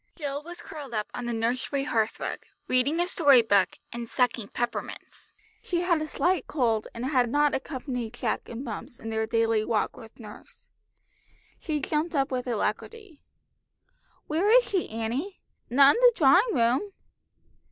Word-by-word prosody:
Jill 285 -3 -4
was 345 +3 -10
curled 280 -6 -8
up 210 -1 -2
on 245 - -5
the - - -1
nursery 250 +4 -1
hearthrug, 225 -5 -1 0.3
reading 265 +6 +1
a 350 - +1
story 285 -9 +5
book, 200 -3 +2 0.2
and 235 -1 -6
sucking 245 -4 0
peppermints. 240 +3 -5 0.3
She 345 -2 -1
had 345 -3 +1
a 310 - -3
slight 360 +4 0
cold, 230 -7 0
and 235 +2 -4
had 255 -3 +2
not 290 +3 +2
accompanied 250 -4 -4
Jack 240 -2 -3
and 240 +4 -6
Bumps 230 +1 -7
in 225 - -6
their 220 0 -1
daily 225 -1 +1
walk 220 -1 -1
with 225 +1 -14
nurse. 210 -2 -13 0.9
She 310 -2 -2
jumped 310 +3 -2
up 275 0 +1
with 255 -1 -2
alacrity. 295 - -4 1.0
"Where 335 +7 0
is - - +6
she, 380 -3 -1
Annie? 235 - -4 0.3
Not 275 +3 +7
in - - -1
the - - +7
drawing 350 - +5
room?" 250 - +1
260 Hz, 160 wpm, -27 LUFS, 230-310 Hz, 1.0 s, Not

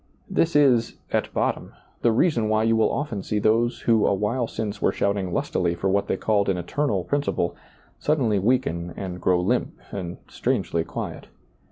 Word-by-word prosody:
This 165 -2 +1
is, 130 -6 +4 0.2
at - - 0
bottom, - - -1 0.3
the 120 - +4
reason 115 -3 +2
why 110 0 +2
you 115 0 +3
will 110 - +3
often 135 -9 -2
see 105 - -2
those 115 +3 +2
who 115 -2 +3
a - - +3
while 115 +5 0
since 110 -2 -4
were - - +3
shouting 100 -2 -1
lustily 85 0 0
for 95 +3 -1
what 100 +1 +1
they - - 0
called 100 -1 +1
an 95 - +1
eternal 100 - -1
principle, 140 -11 -1 0.4
suddenly 125 -9 +1
weaken 95 -7 0
and 90 -2 -5
grow 90 -1 +3
limp 90 - 0
and 90 -3 -5
strangely 85 -1 -1
quiet. - - -6
105 Hz, 175 wpm, -24 LUFS, 95-120 Hz, 0.4 s, is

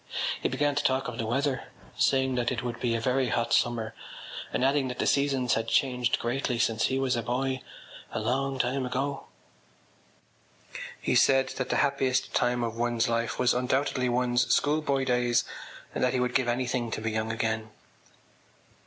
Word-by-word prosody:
He - - +1
began 145 0 +1
to 145 +1 -1
talk 130 0 +1
of 125 0 -6
the 115 - -1
weather, 135 +2 0 0.3
saying 130 -1 +2
that 125 -1 0
it 125 -1 -3
would 120 -1 -4
be 120 -2 0
a - - 0
very 125 +2 +1
hot 115 +1 0
summer 115 -2 +1 0.6
and 130 - +1
adding 135 0 +2
that 125 - -5
the - - 0
seasons 135 -3 +2
had 115 0 -1
changed 125 0 +2
greatly 120 +1 -1
since 115 -1 +1
he 130 - 0
was 135 -2 +1
a 120 - -1
boy—a 130 +2 -4
long 135 +5 -1
time 130 +2 0
ago. 135 +2 -3 1.7
He - - -1
said 135 -1 +4
that 130 - -4
the - - +1
happiest 135 -2 0
time 120 0 +1
of 115 -1 -3
one’s 120 0 +1
life 115 0 -1
was 125 -1 +3
undoubtedly 125 +1 0
one’s 120 0 +2
schoolboy 145 -2 +2
days 125 -1 +2 0.5
and - - -1
that 125 - +2
he 130 - +1
would 125 0 0
give 130 -2 +2
anything 120 0 -1
to - - -3
be 110 0 -1
young 110 +1 -1
again. 110 -1 -2
125 Hz, 180 wpm, -28 LUFS, 120-135 Hz, 1.7 s, said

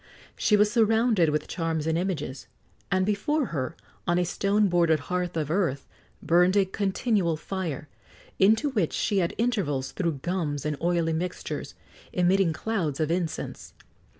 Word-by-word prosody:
She 210 - +3
was 210 0 +4
surrounded 225 -5 +3
with 150 0 -1
charms 165 -3 -2
and 160 0 +1
images, 165 -7 -3 0.4
and 185 -1 +2
before 255 +9 0
her, 140 +2 -2 0.3
on 175 0 +2
a 180 - +3
stone 200 +4 +2
bordered 170 -4 +3
hearth 180 -1 -1
of 155 -1 -1
earth, 165 -7 0 0.4
burned 180 +3 +4
a 195 - +5
continual 195 -2 0
fire, 165 -5 -4 0.5
into 220 +9 +4
which 205 - 0
she 200 -3 +1
at 170 - -1
intervals 185 - 0
threw 170 -4 -1
gums 150 -1 -3
and 150 0 0
oily 170 -1 +1
mixtures, 180 +3 -4 0.4
emitting 180 0 +3
clouds 160 -4 -2
of 155 0 0
incense. 170 -2 -3
180 Hz, 150 wpm, -26 LUFS, 160-200 Hz, 0.5 s, a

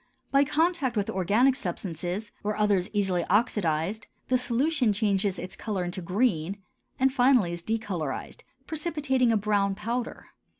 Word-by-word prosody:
By 275 0 +5
contact 300 -4 +1
with 200 - 0
organic 210 +9 +3
substances, 185 - -4
or 210 0 -1
others 205 -4 +2
easily 195 -4 +1
oxidized, 200 -2 0 0.2
the 255 - +4
solution 255 -1 +1
changes 200 -2 0
its 180 +2 -5
color 205 -4 -3
into 175 +1 -4
green 190 -1 0 0.4
and 265 0 +3
finally 245 -9 +4
is 170 - -5
decolorized, 190 -9 -3 0.2
precipitating 295 -6 0
a 225 - +3
brown 200 -1 +1
powder. 235 +3 -4
210 Hz, 135 wpm, -27 LUFS, 185-255 Hz, 0.4 s, By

